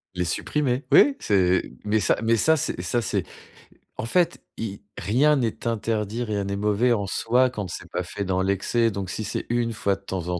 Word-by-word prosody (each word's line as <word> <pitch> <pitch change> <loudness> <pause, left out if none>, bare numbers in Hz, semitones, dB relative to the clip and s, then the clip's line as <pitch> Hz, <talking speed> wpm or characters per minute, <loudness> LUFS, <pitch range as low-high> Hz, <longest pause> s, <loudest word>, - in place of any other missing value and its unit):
Les 90 - 0
supprimer. 130 - -1
Oui, 280 -1 +6
c'est 95 -2 +2
mais 105 +1 +1
ça - - +2
mais 115 +1 +3
ça, 160 +8 +4
c'est 130 - -2
ça, 120 +7 0
c'est 110 - -1 0.7
en - - -3
fait, 170 +7 +1
il 100 -3 -5 0.2
rien 130 - +3
n'est 120 -4 -2
interdit, 110 0 -1
rien 105 -3 -2
n'est 100 0 -3
mauvais 105 +4 +2
en 100 -3 -1
soi 125 +6 +2
quand 105 -6 -5
c'est 90 0 -8
pas 90 +1 -2
fait 100 +3 -5
dans 95 0 0
l'excès. 100 +4 +1
Donc 95 -2 -4
si 110 - -3
c'est 110 - -4
1 120 -1 0
fois 100 -2 0
de 100 - -16
temps 95 -3 -5
en 90 0 -1
105 Hz, 210 wpm, -24 LUFS, 95-120 Hz, 0.7 s, Oui